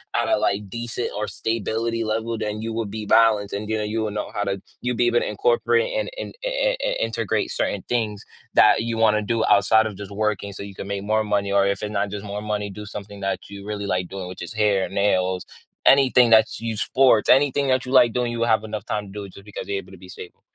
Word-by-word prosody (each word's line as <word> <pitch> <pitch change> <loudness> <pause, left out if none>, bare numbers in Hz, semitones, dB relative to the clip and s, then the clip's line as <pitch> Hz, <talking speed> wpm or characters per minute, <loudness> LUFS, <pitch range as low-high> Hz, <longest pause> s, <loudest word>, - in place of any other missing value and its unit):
at - - +1
a, - - +3
like, 100 0 -1
decent 120 +2 -4
or 105 - -1
stability 115 +1 -2
level, 115 +1 -2
then 105 0 -3
you 115 0 -3
would 110 -2 -3
be 110 0 -5
balanced 105 -2 +4
and, 105 +2 -4
you 110 - 0
know, 105 - -2
you 110 +2 -2
will 110 - -1
know 105 - -4
how 105 - -1
to 100 -1 -2 0.2
you'll 125 -1 -1
be 120 0 +2
able 120 0 +3
to - - -2
incorporate 475 +1 +1
and - - -2
and, - - -6
eh - - 0 0.2
eh - - -1
eh, - - 0
integrate - - -1
certain - - -2
things 110 -4 -1 0.3
that 105 - +7
you 115 -1 -2
wanna 105 -1 +4
do 115 +1 0
outside 110 +2 +4
of 100 -3 -8
just 100 -1 -8
working 100 -1 -2
so - - -8
you 100 -1 -9
can 100 - -7
make 100 -1 -3
more 110 +1 +1
money, 100 -1 0
or 100 0 +4
if 100 0 -1
it 105 - -3
not 100 -1 -1
just 105 -1 -5
more 100 +1 -5
money, 105 -1 -2
do 105 +2 -8
something 100 0 -8
that 95 - -1
you 100 0 -9
really 105 -1 -4
like 90 -2 -1
doing, 95 -2 -6
which 90 0 -9
is 85 - -8
hair, 105 -3 +2
nails, 95 -2 +1 0.4
anything 130 -3 +6
that's 110 0 +4
you 115 -2 -3
sports, 130 -4 +3
anything 140 +1 +4
that 130 -1 +2
you 125 - -6
like 125 -3 +5
doing, 125 -1 0
you 120 - -4
will 115 - +2
have 110 -1 +3
enough 110 0 -5
time 105 -1 -3
to - - -12
do 105 0 -6
it 95 - -11
just 100 - -13
because 105 - -7
you're 100 - -1
able 95 0 -8
to 95 - -12
be 90 - -14
stable. 90 - -11
105 Hz, 260 wpm, -23 LUFS, 100-115 Hz, 0.4 s, that